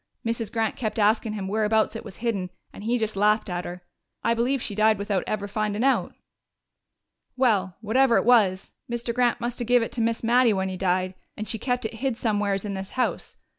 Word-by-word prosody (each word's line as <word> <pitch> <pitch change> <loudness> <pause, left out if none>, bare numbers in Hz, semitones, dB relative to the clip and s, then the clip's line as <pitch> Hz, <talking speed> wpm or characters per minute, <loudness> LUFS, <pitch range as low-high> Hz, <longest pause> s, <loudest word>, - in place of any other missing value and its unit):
Mrs. 230 -2 -2
Grant 225 -2 0
kept 225 -4 -3
askin' 215 +1 +2
him 200 -3 -4
whereabouts 215 +2 +1
it - - -5
was - - -10
hidden, 195 -6 -1 0.2
and - - -10
he 235 +3 +1
just 220 -2 -2
laughed 210 0 +2
at 175 0 -3
her. 175 0 -7 0.4
I 230 - +3
believe 245 +4 +1
she 220 - -4
died 215 +1 +3
without 200 -2 -1
ever 205 -1 -2
findin' 210 +1 -1
out.... 270 0 +1 1.2
"Well, 200 -8 +2
whatever 235 +3 +3
it - - +1
was, 205 -6 +3 0.2
Mr. 235 0 -2
Grant 245 0 +2
must 240 +1 -3
have 240 - -3
give 245 -1 +4
it - - -5
to 240 - -2
Miss 230 0 0
Mattie 240 0 +4
when 190 -1 -1
he 185 - -4
died, 185 0 0 0.2
and 215 - -5
she 225 - -2
kept 245 0 -1
it 220 - -3
hid 250 +1 -2
somewheres 205 -3 0
in 200 - -3
this 190 0 -6
house. 255 - -1
220 Hz, 210 wpm, -25 LUFS, 200-235 Hz, 1.2 s, give